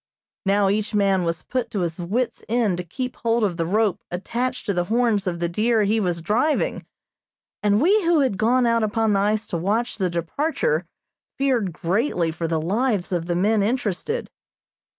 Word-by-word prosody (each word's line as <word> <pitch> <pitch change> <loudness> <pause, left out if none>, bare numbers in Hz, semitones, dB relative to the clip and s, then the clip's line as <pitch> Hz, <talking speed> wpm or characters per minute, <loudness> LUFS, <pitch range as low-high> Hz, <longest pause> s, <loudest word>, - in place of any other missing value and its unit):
Now 200 0 +3
each 210 +2 0
man 195 -3 +2
was 165 0 -2
put 250 -2 -2
to 200 - -2
his 170 0 -3
wit's 215 +9 -2
end 220 -6 +1
to - - -2
keep 250 +9 -5
hold 230 0 +1
of 190 -5 +1
the 165 -1 -1
rope 210 0 +1
attached 240 +8 -3
to 200 - 0
the 175 -1 0
horns 225 -2 +1
of 170 -1 -2
the 170 - 0
deer 215 +5 +2
he 215 +2 +2
was 175 -4 -1
driving, 250 - 0 0.7
and 205 0 +3
we 395 - +4
who 335 -3 +4
had 260 -7 +1
gone 245 +3 +3
out 230 -1 +2
upon 215 0 +1
the 195 - +2
ice 210 +2 +1
to 170 - -3
watch 215 +8 -1
the 185 -2 +1
departure 295 - -1 0.5
feared 250 -8 +1
greatly 175 - 0
for 165 +1 -3
the 160 -1 0
lives 200 +3 0
of 170 -2 -1
the 175 - 0
men 210 +4 +2
interested. 235 - -2
210 Hz, 190 wpm, -23 LUFS, 180-240 Hz, 0.7 s, we